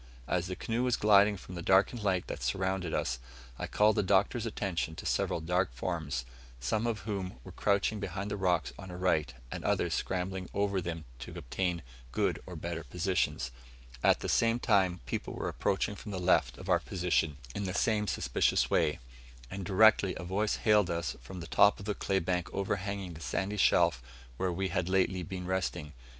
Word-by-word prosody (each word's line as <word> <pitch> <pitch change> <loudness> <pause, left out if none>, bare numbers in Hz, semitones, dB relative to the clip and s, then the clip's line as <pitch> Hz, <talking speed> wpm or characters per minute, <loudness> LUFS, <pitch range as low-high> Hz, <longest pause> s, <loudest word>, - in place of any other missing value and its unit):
As 90 0 0
the 90 - -4
canoe 115 +6 -2
was 125 -1 +2
gliding 105 -1 +5
from 90 - -11
the 85 - -5
darkened 95 +6 +3
light 95 -3 +1
that - - -6
surrounded 95 -2 -1
us, 65 -4 -1 0.4
I - - -3
called 105 0 +3
the - - +4
Doctor's 100 +4 +2
attention 90 -7 -2
to - - -8
several - - 0
dark 90 0 +1
forms; 75 -3 -3 0.3
some 105 - 0
of 110 -5 -2
whom 100 -3 -3
were - - -10
crouching 100 +1 +1
behind 100 +1 -4
the - - 0
rocks 95 -3 +1
on 95 -1 -8
our 90 - -7
right, 80 -7 +1 0.2
and - - -5
others - - +1
scrambling 95 0 -2
over 100 -1 +1
them 85 -2 -5
to - - -8
obtain 90 +5 -2 0.3
good - - 0
or 90 - -7
better 85 +1 -4
positions; 90 -7 -1 0.5
at - - +4
the - - -3
same 115 0 +3
time 95 -6 +2
people 60 - -4
were - - -3
approaching 100 +1 0
from 105 +1 -8
the 95 - -3
left 90 0 +2
of - - -9
our - - +4
position, 85 -4 0 0.2
in 100 - -3
the 90 - -2
same 105 0 +2
suspicious 60 - +1
way; 75 -3 +2 0.5
and 100 0 -4
directly 100 0 +5
a - - -6
voice 100 +4 0
hailed 105 -4 +3
us 85 -6 -2
from 85 +9 -8
the - - -6
top 100 +4 +5
of 100 - -9
the 105 - 0
clay 95 -1 0
bank 90 0 -1
overhanging 100 -1 -2
the 80 - -10
sandy 100 +4 -2
shelf 65 -10 +4 0.4
where 95 +5 0
we 95 +2 -1
had 90 0 -1
lately 95 -1 +2
been 90 +1 -5
resting. 90 -5 -2
95 Hz, 190 wpm, -31 LUFS, 85-100 Hz, 0.5 s, gliding